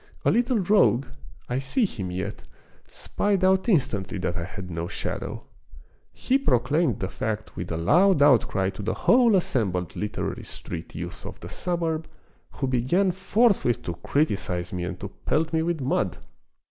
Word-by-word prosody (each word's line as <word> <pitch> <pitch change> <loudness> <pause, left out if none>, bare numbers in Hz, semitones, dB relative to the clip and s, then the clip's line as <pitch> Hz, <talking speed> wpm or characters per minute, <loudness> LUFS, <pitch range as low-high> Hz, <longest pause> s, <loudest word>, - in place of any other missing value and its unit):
A - - +5
little 240 +1 +2
rogue, 185 - +3 0.4
I 125 +1 -1
see 135 - +1
him 95 - -4
yet, 90 +1 -4 0.4
spied 200 -2 -1
out 190 +4 +3
instantly 105 - +1
that 90 -1 -2
I 85 -3 -3
had 95 -1 -8
no 85 +1 -3
shadow. - - -4 0.7
He 265 +2 +1
proclaimed 140 - +2
the 95 - -1
fact 110 +2 -4
with 85 -1 -5
a 80 - -1
loud 175 - +4
outcry 115 -9 +4
to 95 - -8
the 105 +2 -1
whole 240 -3 +5
assembled 95 - 0
literary 105 - -3
street 85 -2 -8
youth - - -6
of - - -8
the - - -8
suburb, 165 -3 -2 0.5
who 140 - -2
began 130 +10 +2
forthwith 190 - +2
to 85 - -3
criticise 95 - -1
me 90 -1 -2
and - - -5
to - - -3 0.2
pelt 160 +1 +1
me 160 - +2
with 165 -2 -1
mud. 130 - 0
130 Hz, 160 wpm, -25 LUFS, -, 0.7 s, A